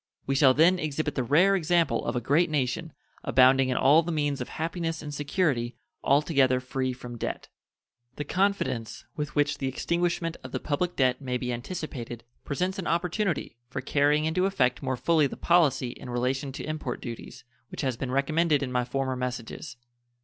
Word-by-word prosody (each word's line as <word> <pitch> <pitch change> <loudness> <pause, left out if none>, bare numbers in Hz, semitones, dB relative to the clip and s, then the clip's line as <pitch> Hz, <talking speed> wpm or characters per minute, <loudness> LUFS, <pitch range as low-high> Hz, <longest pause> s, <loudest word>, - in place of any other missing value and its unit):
We 135 - 0
shall 135 -1 +5
then 175 +4 +5
exhibit 155 -1 -2
the - - -1
rare 170 +11 +4
example 170 -8 +2
of - - -2
a - - +1
great 155 +8 +2
nation, 150 +2 -1 0.3
abounding 130 0 +5
in 125 - 0
all 145 +5 +6
the 170 +1 -4
means 145 -4 -1
of 125 - -5
happiness 165 0 -3
and 150 -1 -6
security, 145 -5 0 0.3
altogether 140 -3 +3
free 130 0 -2
from 125 -2 -8
debt. - - -4 0.7
The 145 - -3
confidence 180 - -1
with 150 -2 -4
which 145 -1 +1
the 135 - -1
extinguishment 170 +4 -1
of 130 - -9
the - - -1
public 175 +4 -1
debt 130 0 +2
may 125 -2 -2
be 125 0 -3
anticipated 120 -3 -6 0.2
presents 180 +7 -2
an 180 - -4
opportunity 175 - -1
for - - -4
carrying 150 +1 +2
into 180 +4 +1
effect 125 -10 +1
more 130 -2 -2
fully 160 +1 +3
the - - -8
policy 160 -7 +3
in 125 - -10
relation 130 +3 -1
to - - -6
import 155 0 -4
duties 120 +1 -8 0.3
which - - -6
has 130 -4 0
been 130 +2 -4
recommended 150 +3 +2
in 130 - -4
my 125 -1 +1
former 130 +1 -2
messages. 125 +1 -5
140 Hz, 180 wpm, -27 LUFS, 130-165 Hz, 0.7 s, all